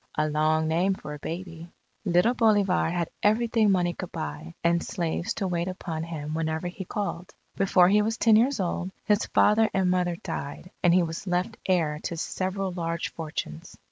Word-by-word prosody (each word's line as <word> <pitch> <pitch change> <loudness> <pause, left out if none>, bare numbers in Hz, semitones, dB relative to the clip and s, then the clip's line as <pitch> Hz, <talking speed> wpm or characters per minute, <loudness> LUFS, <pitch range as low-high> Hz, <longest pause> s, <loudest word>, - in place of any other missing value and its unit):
A 155 0 +2
long 155 +1 +2
name 180 +5 +2
for 150 - -8
a 150 - -8
baby. 170 +1 -6 0.4
Little 180 +6 +3
Bolivar 205 -8 +3
had 170 -1 -2
everything 220 0 +3
money 175 -2 +2
could 185 -1 -7
buy, 165 0 -6
and 170 0 +3
slaves 170 +4 -2
to 195 - -1
wait 175 -1 -1
upon 175 -3 -4
him 155 -2 -5
whenever 160 +1 -2
he 180 +2 -6
called. 185 -3 -4 0.2
Before 185 -2 +4
he 210 +3 +4
was 225 +2 -1
ten 225 -2 +5
years 250 +4 +3
old, 180 0 -1 0.2
his 210 -1 +2
father 220 +1 +4
and 185 -2 +2
mother 180 -1 +1
died 155 +2 -6
and 175 - +4
he 180 +1 +5
was 165 +4 -5
left 180 +5 0
heir 160 -5 +1
to 170 - -3
several 190 +3 -2
large 170 -1 -3
fortunes. 150 - -6
175 Hz, 180 wpm, -26 LUFS, 165-195 Hz, 0.4 s, ten